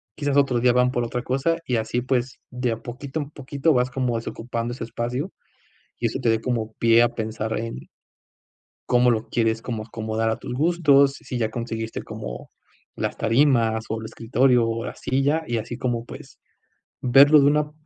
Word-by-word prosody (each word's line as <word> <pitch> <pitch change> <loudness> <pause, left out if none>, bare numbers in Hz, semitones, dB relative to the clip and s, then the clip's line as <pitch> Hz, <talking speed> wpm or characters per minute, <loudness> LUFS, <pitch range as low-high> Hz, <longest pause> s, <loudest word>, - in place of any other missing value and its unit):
quizás 145 -2 0
otro 135 -4 +3
día 125 0 +4
van 125 0 +3
por 120 -2 -1
otra 120 +1 -3
cosa 135 +7 0
y 125 -5 0
así 110 +2 -1
pues 130 0 -1
de 125 -1 -1
a - - -5
poquito 135 +5 -5
en 145 0 -7
poquito 140 +2 0
vas 125 -1 +2
como 125 -2 -1
desocupando 115 +1 -4
ese 125 - -6
espacio 125 - -3 0.7
y 120 - 0
eso 115 +4 -2
te 115 - +3
dé 115 0 +1
como 115 -2 -2
pie 115 +1 +5
a 120 - +4
pensar 110 -1 -3
en 115 +1 -4 1.1
cómo 125 0 +4
lo 115 -1 -1
quieres 115 -1 0
como 115 -3 -4
acomodar 110 0 -2
a 110 - -2
tus - - -6
gustos. 140 -2 +4
Si 125 - -6
ya 110 -2 0
conseguiste 115 -1 -4
como - - -8 0.5
las - - -2
tarimas 115 -2 +2
o 110 - -1
el 110 - -6
escritorio 120 +2 +2
o 115 0 -2
la - - -6
silla 140 +5 0
y 120 -1 -1
así 115 +2 -5
como, 120 -3 -2
pues - - -11 0.6
verlo 140 +4 +7
de 140 - +5
una 150 +1 +2
120 Hz, 190 wpm, -23 LUFS, 115-135 Hz, 1.1 s, verlo